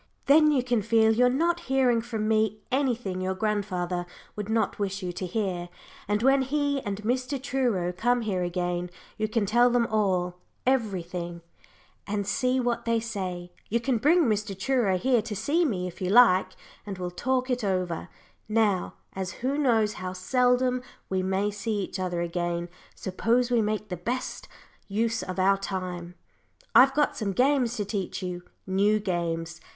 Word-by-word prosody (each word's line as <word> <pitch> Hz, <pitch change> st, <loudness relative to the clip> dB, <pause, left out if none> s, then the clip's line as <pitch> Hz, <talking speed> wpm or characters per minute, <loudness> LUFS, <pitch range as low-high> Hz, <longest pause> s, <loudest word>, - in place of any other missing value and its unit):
Then 305 Hz, +2 st, +6 dB
you 265 Hz, -4 st, +2 dB
can 245 Hz, -3 st, +1 dB
feel 220 Hz, +1 st, +4 dB
you're 250 Hz, +2 st, +4 dB
not 335 Hz, +7 st, +1 dB
hearing 255 Hz, -3 st, +3 dB
from 225 Hz, -2 st, -3 dB
me 215 Hz, -1 st, +1 dB
anything 245 Hz, -8 st, 0 dB
your 190 Hz, 0 st, -1 dB
grandfather 185 Hz, -4 st, -1 dB, 0.3 s
would 210 Hz, 0 st, -5 dB
not 220 Hz, -1 st, 0 dB
wish 195 Hz, -1 st, -2 dB
you 180 Hz, -1 st, -3 dB
to 185 Hz, +1 st, -4 dB
hear, 180 Hz, -3 st, -2 dB, 0.4 s
and 210 Hz, +2 st, 0 dB
when 270 Hz, +1 st, +5 dB
he 285 Hz, +1 st, 0 dB
and 205 Hz, -1 st, -5 dB
Mr. 255 Hz, +4 st, -1 dB
Truro 240 Hz, -10 st, 0 dB
come 240 Hz, +6 st, +1 dB
here 200 Hz, -5 st, -1 dB
again, 175 Hz, 0 st, -2 dB, 0.3 s
you 215 Hz, -, +1 dB
can 215 Hz, -1 st, 0 dB
tell 240 Hz, +4 st, +4 dB
them 240 Hz, -1 st, +2 dB
all 185 Hz, -5 st, 0 dB, 0.3 s
everything, 180 Hz, -8 st, -1 dB, 0.7 s
and 205 Hz, -1 st, -1 dB
see 255 Hz, +6 st, +1 dB
what 240 Hz, -2 st, -1 dB
they 230 Hz, -1 st, +2 dB
say. 185 Hz, -6 st, -5 dB, 0.2 s
You 235 Hz, -, +1 dB
can 240 Hz, -1 st, 0 dB
bring 330 Hz, +8 st, +4 dB
Mr. 210 Hz, -5 st, -1 dB
Truro 220 Hz, -4 st, +1 dB
here 245 Hz, +4 st, +2 dB
to 215 Hz, -1 st, -5 dB
see 325 Hz, -, +1 dB
me, 185 Hz, -, -1 dB
if 180 Hz, -, -10 dB
you 185 Hz, -, -1 dB
like, 190 Hz, -4 st, +5 dB, 0.3 s
and 200 Hz, -2 st, -6 dB
we'll 180 Hz, -1 st, -4 dB
talk 255 Hz, +7 st, -1 dB
it 250 Hz, -1 st, -1 dB
over. 185 Hz, -4 st, -1 dB, 0.4 s
Now, 215 Hz, -4 st, +1 dB, 0.2 s
as 190 Hz, -1 st, -4 dB
who 270 Hz, +2 st, +1 dB
knows 230 Hz, -7 st, +2 dB
how 185 Hz, 0 st, -4 dB
seldom 250 Hz, +5 st, +2 dB, 0.3 s
we 190 Hz, -1 st, 0 dB
may 190 Hz, +2 st, 0 dB
see 210 Hz, +1 st, -3 dB
each 190 Hz, -, -5 dB
other 180 Hz, -2 st, -1 dB
again, 175 Hz, 0 st, -2 dB, 0.3 s
suppose 235 Hz, +6 st, 0 dB
we 240 Hz, -2 st, +4 dB
make 215 Hz, 0 st, -2 dB
the 180 Hz, -, -3 dB
best 240 Hz, +9 st, -4 dB, 0.4 s
use 225 Hz, +3 st, 0 dB
of 185 Hz, -1 st, -5 dB
our 195 Hz, +1 st, +4 dB
time. 180 Hz, -3 st, -5 dB, 0.6 s
I've 270 Hz, +2 st, +7 dB
got 295 Hz, 0 st, +2 dB
some 200 Hz, -3 st, -2 dB
games 255 Hz, +1 st, +2 dB
to 210 Hz, -, -2 dB
teach 195 Hz, -1 st, -3 dB
you 180 Hz, -1 st, -4 dB, 0.2 s
new 200 Hz, +3 st, +2 dB
games. 170 Hz, -3 st, -3 dB
210 Hz, 170 wpm, -27 LUFS, 185-245 Hz, 0.7 s, I've